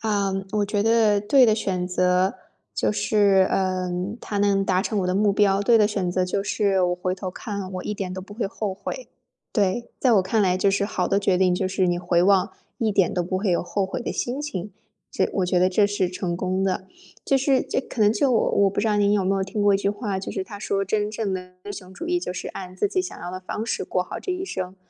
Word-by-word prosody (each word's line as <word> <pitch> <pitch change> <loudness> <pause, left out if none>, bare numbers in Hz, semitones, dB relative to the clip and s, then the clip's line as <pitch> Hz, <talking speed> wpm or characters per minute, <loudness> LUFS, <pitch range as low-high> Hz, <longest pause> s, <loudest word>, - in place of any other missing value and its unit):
啊， 205 -3 0 0.2
我 210 -1 +1
觉 205 0 0
得 220 -2 +3
对 255 +6 +5
的 220 -3 +4
选 185 -4 -2
择 180 +1 +2 0.4
就 105 +1 +1
是， 190 - +3
嗯， 185 +1 -1
它 205 - -4
能 200 -1 +2
达 185 -1 +2
成 210 +1 -1
我 180 - -1
的 180 - 0
目 205 0 +3
标。 195 -1 +3
对 230 +3 +4
的 210 - +5
选 195 -4 -1
择 185 +1 +1
就 195 +2 -1
是 200 -1 +1
我 180 0 +2
回 180 +1 -2
头 185 0 -5
看 200 -1 -6
我 185 - -5
一 210 - -2
点 190 -3 -4
都 185 - -5
不 205 +2 -12
会 225 0 -2
后 205 0 -3
悔。 205 - -7 0.4
对， 205 +2 0
在 250 -3 +3
我 195 - +4
看 210 +4 0
来 185 -2 +3
就 195 +1 +2
是 200 +1 +1
好 205 - -1
的 200 - +2
决 195 -2 +2
定， 185 -1 +3
就 185 +1 -1
是 190 0 +1
你 175 0 +1
回 175 -1 +2
望 195 +1 +3 0.3
一 220 -2 +1
点 195 -3 +2
都 180 - 0
不 185 +2 -2
会 195 +1 0
有 170 - +1
后 195 +2 -1
悔 190 - -4
的 - - -3
心 255 +4 -2
情。 205 -9 -5 0.4
这 - - 0
我 190 - 0
觉 180 0 +1
得 185 +1 +4
这 200 +2 +3
是 200 -3 0
成 180 -1 -3
功 185 +1 -1
的， 190 0 -1 0.4
这 275 - +3
是 270 0 +2
这 - - -1
可 250 - -8
能 210 0 +5
就 260 +5 +2
我 230 - +2
我 200 -1 +4
不 200 - -1
知 215 - 0
道 210 -1 +2
您 205 -1 +3
有 200 -2 +2
没 195 +1 +2
有 195 - 0
听 195 +2 -4
过 205 -1 +4
一 - - +5
句 200 0 0
话， 205 -3 -3
就 - - -5
是 190 - -3
它 205 +2 -9
说 195 -1 -1
真 210 +1 -1
正 215 -3 -2
的 180 0 -6
英 205 - -6
雄 185 -2 -10
主 335 - -7
义 350 0 +1
就 180 - -4
是 - - -6
按 185 -1 -8
自 205 - +1
己 370 - 0
想 365 - -8
要 175 - -6
的 185 +1 -6
方 210 +4 -5
式 - - -2
过 180 - -1
好 - - -7
这 - - -4
一 365 +1 -2
生。 185 - -5
195 Hz, 285 characters per minute, -24 LUFS, 185-210 Hz, 0.4 s, 对